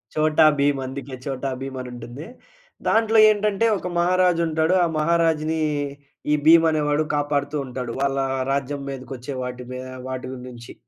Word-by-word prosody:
చోటా 155 Hz, 0 st, +4 dB
భీమ్ 140 Hz, -1 st, +2 dB
అందుకే 135 Hz, 0 st, -7 dB
చోటా 135 Hz, -1 st, -3 dB
భీమ్ 135 Hz, -1 st, -5 dB
అని 125 Hz, -, -7 dB
ఉంటుంది. 120 Hz, +5 st, -9 dB, 0.6 s
దాంట్లో 225 Hz, 0 st, +3 dB
ఏంటంటే 210 Hz, 0 st, +1 dB
ఒక 180 Hz, -, -5 dB
మహారాజు 180 Hz, -1 st, +3 dB
ఉంటాడు. 160 Hz, +2 st, +1 dB
ఆ -, -, +1 dB
మహారాజుని 160 Hz, -1 st, +1 dB, 0.7 s
ఈ -, -, +5 dB
భీమ్ 165 Hz, 0 st, +7 dB
అనేవాడు 150 Hz, 0 st, +1 dB
కాపాడుతూ 145 Hz, 0 st, -1 dB
ఉంటాడు. 125 Hz, -1 st, -5 dB
వాళ్ళా 135 Hz, -1 st, +1 dB, 0.3 s
రాజ్యం 140 Hz, +1 st, -2 dB
మీదకి 135 Hz, 0 st, -7 dB
వచ్చే 130 Hz, +3 st, -7 dB
వాటి 125 Hz, 0 st, -6 dB
మీ 125 Hz, -, -5 dB, 0.3 s
వాటి 130 Hz, -1 st, -5 dB, 0.2 s
నుంచి. 120 Hz, -1 st, -11 dB
145 Hz, 150 wpm, -23 LUFS, 130-165 Hz, 0.7 s, భీమ్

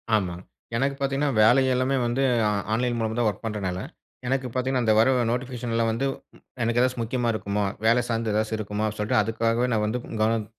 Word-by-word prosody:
ஆமாங், 90 Hz, -3 st, -2 dB, 0.3 s
எனக்கு 135 Hz, +3 st, 0 dB
பாத்திங்கன்னா, 140 Hz, +1 st, 0 dB
வேலை 125 Hz, +5 st, +5 dB
எல்லாமே 130 Hz, +2 st, +1 dB
வந்து 120 Hz, +3 st, 0 dB, 0.5 s
ஆன்லைன் 120 Hz, +1 st, 0 dB
மூலமா 110 Hz, 0 st, -1 dB
தான் 120 Hz, -, +2 dB
வொர்க் 105 Hz, +3 st, -7 dB
பண்றனால, 95 Hz, -4 st, -3 dB, 0.5 s
எனக்கு 130 Hz, 0 st, 0 dB
பார்த்திங்கன்னா, 130 Hz, 0 st, 0 dB
அந்த 110 Hz, -, +4 dB
வர 115 Hz, +4 st, +5 dB, 0.2 s
நோட்டிஃபிகேஷன்லா 120 Hz, -2 st, -2 dB
வந்து 115 Hz, +5 st, -1 dB, 0.6 s
எனக்கு 115 Hz, +1 st, +1 dB
ஏதாச்சும் 125 Hz, -2 st, +1 dB
முக்கியமா 120 Hz, 0 st, -1 dB
இருக்குமோ, 105 Hz, -1 st, -2 dB, 0.2 s
வேல 120 Hz, +1 st, +4 dB
சார்ந்து 115 Hz, -1 st, -1 dB
ஏதாச்சு 110 Hz, +1 st, 0 dB
இருக்குமோ 105 Hz, +1 st, -2 dB
அப்படினு 105 Hz, 0 st, -6 dB
சொல்லிட்டு, 105 Hz, +1 st, +2 dB
அதுக்காகவே 115 Hz, +3 st, 0 dB
நா 110 Hz, -, +2 dB
வந்து 120 Hz, +3 st, -2 dB, 0.2 s
கவனம் 110 Hz, -1 st, +1 dB
115 Hz, 175 wpm, -25 LUFS, 110-125 Hz, 0.6 s, வேலை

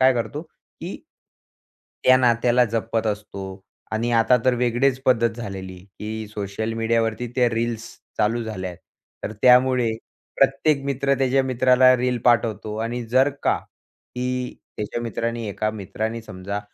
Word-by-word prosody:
काय 130 Hz, 0 st, +6 dB
करतो, 145 Hz, +6 st, -3 dB
की 160 Hz, -, -10 dB, 1.1 s
त्या 130 Hz, -, +7 dB
नात्याला 120 Hz, 0 st, +3 dB
जपत 115 Hz, 0 st, -1 dB
असतो. 100 Hz, -2 st, -5 dB, 0.3 s
आणि 115 Hz, +2 st, 0 dB
आता 115 Hz, +2 st, +5 dB
तर 130 Hz, -1 st, +4 dB
वेगळीच 125 Hz, +2 st, +1 dB
पद्धत 115 Hz, -2 st, +3 dB
झालेली, 95 Hz, -5 st, -7 dB, 0.2 s
की 110 Hz, 0 st, -5 dB
सोशल 105 Hz, +1 st, -4 dB
मीडियावरती 115 Hz, +1 st, 0 dB
त्या 125 Hz, -2 st, +3 dB
रील्स 115 Hz, 0 st, -2 dB, 0.3 s
चालू 115 Hz, +3 st, +1 dB
झाल्या 95 Hz, -5 st, -4 dB
आहेत. 90 Hz, -, -12 dB, 0.5 s
तर 110 Hz, -, -3 dB
त्यामुळे 125 Hz, -1 st, +5 dB, 0.5 s
प्रत्येक 140 Hz, +1 st, +3 dB
मित्र 140 Hz, 0 st, +1 dB
त्याच्या 135 Hz, 0 st, +3 dB
मित्राला 130 Hz, 0 st, +5 dB
रील 125 Hz, 0 st, 0 dB
पाठवतो. 110 Hz, -3 st, +2 dB
आणि 115 Hz, +2 st, -3 dB
जर 130 Hz, +4 st, +4 dB
का -, -, +3 dB, 0.6 s
की 125 Hz, 0 st, -2 dB, 0.2 s
त्याच्या 105 Hz, +2 st, -3 dB
मित्रांनी 115 Hz, 0 st, -3 dB
एका 110 Hz, +2 st, -1 dB
मित्राने 110 Hz, +2 st, -4 dB
समजा 100 Hz, 0 st, -5 dB
115 Hz, 135 wpm, -23 LUFS, 110-125 Hz, 1.1 s, त्या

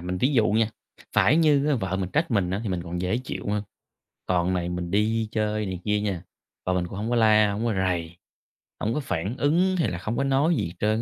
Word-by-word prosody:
mình 90 Hz, +1 st, -3 dB
ví 135 Hz, +4 st, +2 dB
dụ 110 Hz, -3 st, +4 dB
nha, 110 Hz, +1 st, +2 dB, 0.4 s
phải 150 Hz, -, +4 dB
như 150 Hz, -3 st, +4 dB
á 150 Hz, -, +3 dB
vợ 95 Hz, -5 st, -2 dB
mình 95 Hz, -1 st, -3 dB
trách 155 Hz, +1 st, 0 dB
mình 100 Hz, -6 st, +1 dB
á 95 Hz, +2 st, -1 dB
thì 110 Hz, -, -3 dB
mình 90 Hz, -2 st, -2 dB
còn 90 Hz, 0 st, -5 dB
dễ 95 Hz, +6 st, 0 dB
chịu 130 Hz, -, -6 dB
ha. 105 Hz, 0 st, 0 dB, 0.6 s
Còn 90 Hz, 0 st, +1 dB
này 90 Hz, -1 st, -1 dB
mình 90 Hz, 0 st, -4 dB
đi 110 Hz, +2 st, +1 dB
chơi 105 Hz, -1 st, -1 dB
này 95 Hz, -2 st, -4 dB
kia 105 Hz, -1 st, +1 dB
nha, 95 Hz, -4 st, -2 dB, 0.4 s
vợ 90 Hz, -, +1 dB
mình 90 Hz, -1 st, 0 dB
cũng 95 Hz, -, -8 dB
hổng 110 Hz, +3 st, -3 dB
có 120 Hz, -, +1 dB
la, 110 Hz, -2 st, +5 dB
hổng 110 Hz, +3 st, -2 dB
có 115 Hz, -, +1 dB
rầy, 90 Hz, -3 st, -1 dB, 0.6 s
hông 110 Hz, +2 st, -1 dB
có 150 Hz, -, -1 dB
phản 100 Hz, -, -3 dB
ứng 175 Hz, +6 st, +2 dB
hay 145 Hz, -10 st, +1 dB
là 85 Hz, -, -4 dB
không 110 Hz, +6 st, -3 dB
có 140 Hz, -, +1 dB
nói 140 Hz, +5 st, +2 dB
gì 85 Hz, -7 st, -2 dB
trơn 110 Hz, +1 st, +1 dB
105 Hz, 250 wpm, -25 LUFS, 90-120 Hz, 0.6 s, la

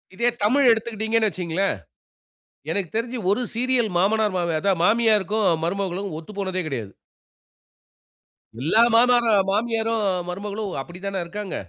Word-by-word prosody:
இதே 235 Hz, +5 st, +2 dB
தமிழ் 260 Hz, +6 st, +4 dB
எடுத்துக்கிட்டீங்கணு 220 Hz, 0 st, 0 dB
வைச்சுங்களேன். 185 Hz, 0 st, -1 dB, 1.0 s
எனக்குத் 195 Hz, -2 st, -3 dB
தெரிஞ்சு 240 Hz, +2 st, -3 dB
ஒரு 205 Hz, +5 st, +2 dB
சீரியல் 245 Hz, -1 st, +1 dB
மாமனார் 210 Hz, +2 st, +2 dB
மா -, -, 0 dB, 0.2 s
அதா 200 Hz, +5 st, +1 dB
மாமியாருக்கும் 215 Hz, 0 st, +2 dB, 0.2 s
மருமகளும் 195 Hz, +2 st, -2 dB
ஒத்து 165 Hz, +5 st, -12 dB
போனதே 190 Hz, -2 st, -2 dB
கிடையாது. 115 Hz, -9 st, -5 dB, 1.7 s
எல்லா 190 Hz, -, +4 dB
மாமாக 240 Hz, +1 st, +5 dB, 0.2 s
மாமியாரும் 225 Hz, +1 st, 0 dB, 0.3 s
மருமகளும் 200 Hz, +2 st, -4 dB
அப்படித்தான 190 Hz, +6 st, -6 dB
இருக்காங்க? 195 Hz, +2 st, -6 dB
210 Hz, 115 wpm, -23 LUFS, 190-225 Hz, 1.7 s, மாமாக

